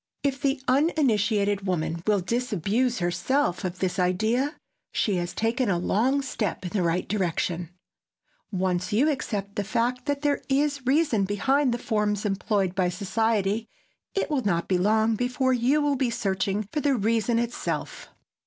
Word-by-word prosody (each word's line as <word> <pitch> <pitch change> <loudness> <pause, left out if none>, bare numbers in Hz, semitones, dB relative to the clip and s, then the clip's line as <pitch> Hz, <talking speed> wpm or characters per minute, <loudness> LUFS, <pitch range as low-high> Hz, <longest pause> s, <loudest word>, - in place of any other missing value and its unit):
If 275 -1 -1
the 275 0 +1
uninitiated 220 - +2
woman 165 -2 -1
will 205 -2 +3
disabuse 235 +2 0
herself 180 +5 0
of 180 -1 -3
this 185 0 -1
idea, 220 - +1 0.4
she 200 -4 0
has 175 0 -2
taken 230 +1 0
a 180 - +2
long 255 +10 +1
step 215 -8 -3
in 180 - -4
the 200 - 0
right 170 +1 0
direction. 175 -3 -1 0.8
Once 185 -1 -1
you 265 +9 +3
accept 200 -7 -4
the 205 - +1
fact 245 +5 -1
that 285 -1 0
there 290 -1 +1
is 280 0 +1
reason 270 -8 +3
behind 260 +7 +1
the 235 - 0
forms 210 -3 -1
employed 195 -2 0
by 185 -2 +1
society, 210 +3 0 0.5
it 390 - -1
will 275 -4 +1
not 170 -4 0
be 185 -2 +1
long 220 +3 +3
before 250 +3 +1
you 255 +5 +2
will 290 -1 +1
be 255 -2 +1
searching 200 -1 -1
for 300 - 0
the 285 -2 +2
reason 230 +1 +1
itself. 235 0 -3
220 Hz, 160 wpm, -26 LUFS, 190-260 Hz, 0.8 s, will